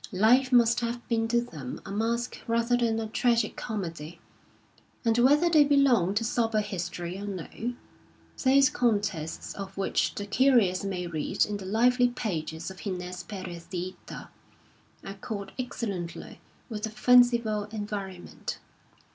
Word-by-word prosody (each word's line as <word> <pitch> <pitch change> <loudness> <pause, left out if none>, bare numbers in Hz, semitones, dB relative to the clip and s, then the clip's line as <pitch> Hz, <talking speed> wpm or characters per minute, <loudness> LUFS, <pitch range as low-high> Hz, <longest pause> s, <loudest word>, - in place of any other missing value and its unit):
Life 245 +7 +4
must 235 -1 +5
have 235 0 -4
been 225 -1 +1
to 235 +1 +2
them 150 - -7
a 195 - -7
masque 230 +4 -2
rather 235 +1 +2
than 230 -2 +1
a 225 - -2
tragi 235 +2 +2
comedy; 170 -7 -6 0.9
and 225 -1 +3
whether 290 +7 +5
they 315 -3 +6
belong 265 -10 +3
to 225 - +1
sober 225 -1 +1
history 175 -2 -5
or 205 - -6
no, 205 +5 -5 0.7
those 275 +1 +5
contests 205 -9 -1
of 195 -1 -8
which 195 - 0
the 205 - -4
curious 215 -5 +3
may 185 -3 -3
read 160 -3 0
in 210 -1 -3
the 195 - -8
lively 245 +5 +3
pages 165 -8 -4
of 190 - -11
Gines 180 -2 -4
Perez 180 -4 -8
de 180 0 -4 0.2
Hita - - -8 0.7
accord 200 0 -6
excellently 200 -8 -5 0.3
with 215 -4 -5
the 220 - -2
fanciful 235 -2 +4
environ 205 -4 -5
ment. - - -6
215 Hz, 145 wpm, -28 LUFS, 185-240 Hz, 0.9 s, they